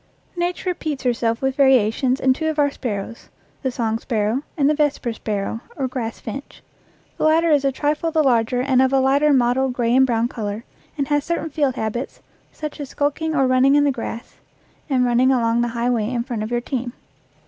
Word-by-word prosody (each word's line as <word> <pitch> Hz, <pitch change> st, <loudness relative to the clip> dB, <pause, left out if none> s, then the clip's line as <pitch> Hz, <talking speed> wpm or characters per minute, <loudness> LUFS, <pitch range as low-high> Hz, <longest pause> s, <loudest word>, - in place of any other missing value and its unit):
Nature 355 Hz, +1 st, -1 dB
repeats 310 Hz, -6 st, -4 dB
herself 235 Hz, -1 st, 0 dB
with 265 Hz, 0 st, 0 dB
variations 260 Hz, -1 st, +3 dB
in 260 Hz, 0 st, +3 dB
two 315 Hz, +4 st, -2 dB
of 315 Hz, -, -3 dB
our 285 Hz, -1 st, +3 dB
sparrows 230 Hz, -3 st, -5 dB, 0.3 s
the 265 Hz, -, -1 dB
song 225 Hz, -3 st, -2 dB
sparrow, 225 Hz, +1 st, -1 dB, 0.2 s
and 280 Hz, -2 st, +3 dB
the 300 Hz, -, +4 dB
vesper 290 Hz, -5 st, 0 dB
sparrow, 215 Hz, 0 st, -3 dB, 0.2 s
or 270 Hz, -, -1 dB
grass 240 Hz, -3 st, -5 dB
finch. 270 Hz, +6 st, -8 dB, 0.6 s
The -, -, -1 dB
latter 320 Hz, +1 st, +4 dB
is 290 Hz, -2 st, +3 dB
a 275 Hz, -, +2 dB
trifle 295 Hz, +4 st, -1 dB
the 320 Hz, -1 st, +2 dB
larger 245 Hz, -2 st, +2 dB
and 260 Hz, -1 st, +3 dB
of 265 Hz, 0 st, +3 dB
a 270 Hz, -, +3 dB
lighter 280 Hz, +3 st, +3 dB
mottled 255 Hz, 0 st, +2 dB
gray 240 Hz, -1 st, +1 dB
and 265 Hz, 0 st, +5 dB
brown 235 Hz, -1 st, +1 dB
color, 215 Hz, -2 st, -5 dB, 0.3 s
and 280 Hz, -2 st, -1 dB
has 290 Hz, -1 st, +2 dB
certain 325 Hz, -1 st, -3 dB
field 285 Hz, -3 st, 0 dB
habits, 230 Hz, +3 st, -4 dB, 0.3 s
such 305 Hz, 0 st, -7 dB
as 285 Hz, -2 st, -6 dB
skulking 305 Hz, +2 st, -1 dB
or 270 Hz, -3 st, +3 dB
running 255 Hz, +2 st, +4 dB
in 290 Hz, -, +4 dB
the 285 Hz, -, +3 dB
grass 235 Hz, -1 st, -7 dB, 0.5 s
and 255 Hz, -3 st, +2 dB
running 245 Hz, +2 st, +3 dB
along 235 Hz, -2 st, +2 dB
the 240 Hz, -, +1 dB
high 240 Hz, +1 st, +1 dB
way 220 Hz, -3 st, 0 dB
in 240 Hz, -2 st, -1 dB
front 240 Hz, -4 st, -4 dB
of 215 Hz, -, -3 dB
your 240 Hz, 0 st, -1 dB
team. 245 Hz, -1 st, -4 dB
260 Hz, 205 wpm, -21 LUFS, 235-285 Hz, 0.6 s, and